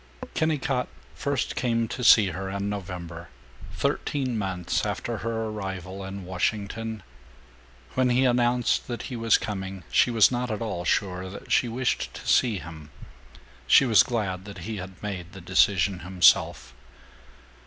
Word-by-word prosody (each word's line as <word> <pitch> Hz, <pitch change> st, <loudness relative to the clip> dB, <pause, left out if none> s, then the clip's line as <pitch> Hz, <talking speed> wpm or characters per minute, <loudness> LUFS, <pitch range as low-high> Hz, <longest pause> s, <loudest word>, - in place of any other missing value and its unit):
IV -, -, -11 dB
Kennicott 140 Hz, -5 st, 0 dB, 0.3 s
first 140 Hz, -1 st, -2 dB
came 115 Hz, -2 st, 0 dB
to 125 Hz, -, -5 dB
see 110 Hz, -4 st, +7 dB
her 95 Hz, +2 st, -5 dB
in 100 Hz, +1 st, -3 dB
November, 90 Hz, -4 st, -6 dB, 0.4 s
thirteen 130 Hz, -4 st, -1 dB
months 95 Hz, -4 st, -1 dB
after -, -, -3 dB
her 115 Hz, -1 st, -2 dB
arrival 95 Hz, -3 st, -5 dB
in 95 Hz, 0 st, -7 dB
Washington. 105 Hz, +3 st, -2 dB, 0.9 s
When 130 Hz, -1 st, +2 dB
he 125 Hz, +2 st, +3 dB
announced 120 Hz, -1 st, +2 dB
that 120 Hz, -1 st, -4 dB
he 125 Hz, -, -6 dB
was 115 Hz, -1 st, +3 dB
coming 95 Hz, -3 st, -5 dB
she -, -, +4 dB
was 115 Hz, -1 st, +5 dB
not 125 Hz, 0 st, -2 dB
at 110 Hz, -, -2 dB
all 105 Hz, -7 st, -4 dB
sure 95 Hz, -1 st, 0 dB
that 100 Hz, -, -10 dB
she 125 Hz, -, +3 dB
wished 125 Hz, +2 st, -1 dB
to -, -, -9 dB
see 115 Hz, -5 st, +3 dB
him. 80 Hz, -4 st, -10 dB, 0.8 s
She 135 Hz, -, +7 dB
was 110 Hz, -5 st, +6 dB
glad 100 Hz, -6 st, -2 dB
that 100 Hz, -4 st, -9 dB
he 110 Hz, 0 st, -4 dB
had 95 Hz, 0 st, -9 dB
made 95 Hz, -3 st, -5 dB
the 95 Hz, -, -9 dB
decision 95 Hz, +1 st, +2 dB
himself. 85 Hz, -8 st, +3 dB
100 Hz, 155 wpm, -26 LUFS, 95-120 Hz, 0.9 s, see